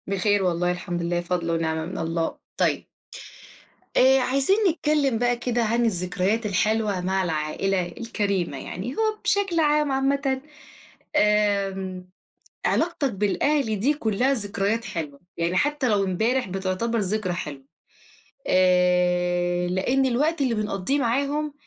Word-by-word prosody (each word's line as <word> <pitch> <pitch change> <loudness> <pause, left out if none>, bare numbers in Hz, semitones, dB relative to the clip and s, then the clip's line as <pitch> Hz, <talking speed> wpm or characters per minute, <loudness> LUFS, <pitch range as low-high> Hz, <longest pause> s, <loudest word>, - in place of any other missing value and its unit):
بخير 200 +1 +1
والله 175 0 +1
الحمد 180 -1 -4
لله، 175 0 0
فضل 175 -1 -2
ونعمة 160 -1 -1
من 185 +3 -6
الله. 165 0 -2 0.2
طيب - - +1 1.1
آآ، 265 +1 +6
عايزين 275 +8 +2
نتكلم 300 -6 +1
بقى 245 +1 +1
كده 240 -1 -1
عن 235 +2 +1
الذكريات 190 +2 0
الحلوة 210 0 +1
مع 190 +1 0
العائلة 175 +3 -1
الكَريمة 200 - -2
يعني، 190 - -6
هو 435 -1 +1
بشكل 390 -4 +1
عام 300 -2 +2
عامةً 270 0 0 0.7
آمم، 195 -3 +1 0.6
علاقتك 315 -5 +1
بالأهل 215 +4 0
دي 270 +9 +2
كلها 245 0 +1
ذكريات 215 -1 -1
حلوة، 160 -8 -5 0.2
يعني 170 +2 0
حتى 290 +6 +1
لو 205 -2 +2
امبارح 220 +7 0
بتعتبر 195 +5 -1
ذكرى 200 -2 -1
حلوة، 145 -6 -6 0.8
آآ، 180 -1 +2
لأن 215 +10 +1
الوقت 285 +6 +1
اللي 255 -4 +1
بنقضيه 210 +5 -1
معاهم 280 +4 0
205 Hz, 125 wpm, -24 LUFS, 180-260 Hz, 1.1 s, آآ